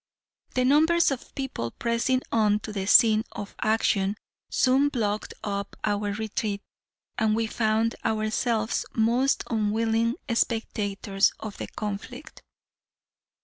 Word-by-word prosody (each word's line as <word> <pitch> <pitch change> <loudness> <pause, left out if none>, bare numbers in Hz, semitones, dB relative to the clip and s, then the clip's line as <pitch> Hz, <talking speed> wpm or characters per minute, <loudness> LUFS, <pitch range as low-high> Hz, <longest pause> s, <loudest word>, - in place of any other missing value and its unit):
The 255 0 +2
numbers 320 +4 +4
of 265 - -6
people 265 - -3
pressing 235 - 0
on 210 -2 +3
to 215 - -7
the 195 -2 -3
scene 220 -1 +6
of 205 - -7
action 210 -2 +1 0.3
soon 270 +2 +3
blocked 215 -6 -2
up 200 -1 -3
our 205 -1 0
retreat, 210 -1 -3 0.6
and 215 -1 +2
we 225 0 +1
found 220 0 +1
ourselves 220 +1 0
most 240 +5 +2
unwilling 225 +1 +1 0.2
spectators 205 -4 0
of 215 -2 -7
the - - -4
conflict. 215 +8 -7
220 Hz, 115 wpm, -26 LUFS, 210-240 Hz, 0.6 s, scene